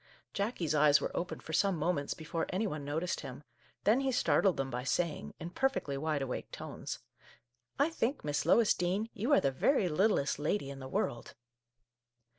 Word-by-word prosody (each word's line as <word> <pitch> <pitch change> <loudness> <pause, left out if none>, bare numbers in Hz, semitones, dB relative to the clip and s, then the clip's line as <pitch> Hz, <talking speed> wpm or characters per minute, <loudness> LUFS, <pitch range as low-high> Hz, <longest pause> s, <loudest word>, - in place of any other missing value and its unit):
Jackie's 200 -6 -1
eyes 150 -1 +6
were - - -4
open 175 - -3
for 160 - -8
some 190 +2 +2
moments 150 -2 -1
before 160 +1 -3
any 190 +4 0
one 150 -7 -3
noticed 160 +6 -2
him; 130 +3 -8 0.4
then 220 +5 +4
he 270 -1 +1
startled 210 -7 +3
them 135 -1 -2
by 125 +1 -3
saying, 160 +4 -1
in 170 +2 -6
per 270 +8 +2
fectly 145 - -4
wide 150 0 -1
awake 125 - -4
tones: - - -6 0.4
" - - -49 0.3
I 290 +4 +3
think, 270 -2 -1
Miss 145 0 0
Lois 230 -2 +5
Dean, 190 +6 -1
you 230 +5 -2
are 285 - +7
the 135 - +2
very 195 - +2
littlest 170 -4 +2
lady 150 -1 -1
in 135 - -8
the 130 - -7
world 120 -2 -2
165 Hz, 190 wpm, -32 LUFS, 145-210 Hz, 0.4 s, are